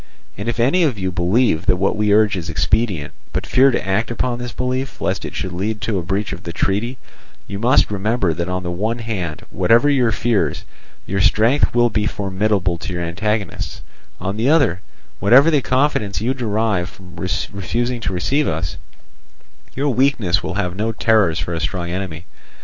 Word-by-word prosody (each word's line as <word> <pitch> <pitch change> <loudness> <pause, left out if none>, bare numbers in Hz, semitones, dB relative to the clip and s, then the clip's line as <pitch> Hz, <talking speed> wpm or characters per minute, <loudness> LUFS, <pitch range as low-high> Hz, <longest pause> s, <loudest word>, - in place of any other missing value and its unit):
And 100 +4 -4
if 120 - -3
any 135 +10 +3
of 145 -9 +2
you 95 -1 -2
believe 90 +1 +1
that 90 - +4
what 95 +3 0
we 105 -1 +1
urge 105 0 +4
is 85 -2 -5
expedient, 85 -1 0 0.2
but - - -2
fear 135 +2 +5
to 120 - -1
act 100 +4 +1
upon 120 +1 -1
this 120 0 -5
belief, 130 +2 -3
lest - - -2
it - - -7
should 95 - -3
lead 105 +5 -2
to 105 -4 -1
a - - -2
breach 100 +4 -2
of 90 - -8
the 85 - -6
treaty, 110 +9 -1 0.5
you 100 - -6
must 120 0 +3
remember 100 -2 0
that 85 +2 -3
on 90 0 -2
the 90 - -3
one 110 +7 -1
hand, 100 -9 -4
whatever 120 +6 +4
your 125 -5 +3
fears, 110 +1 0 0.4
your 100 +1 -1
strength 115 +7 +3
will 120 -1 +4
be 105 -1 0
formidable 95 -3 0
to 95 - -5
your 85 0 -2
antagonists; 100 +3 -3 0.4
on 95 +3 -3
the 115 +5 +1
other, 140 - +3 0.4
whatever 130 - +6
the 150 -3 +3
confidence 130 -7 0
you 120 +5 0
derive 110 -6 -1
from 90 -2 -15
refusing 100 +7 -2
to 95 - -2
receive 135 +11 0
us, 80 -1 -2 1.0
your 145 +2 0
weakness 120 -9 +2
will 95 - -4
have 90 -3 -1
no 110 +3 -1
terrors 110 -7 +2
for 85 - -3
a 85 - -2
strong 85 -1 -2
enemy. 90 -3 -5
105 Hz, 190 wpm, -20 LUFS, 90-120 Hz, 1.0 s, whatever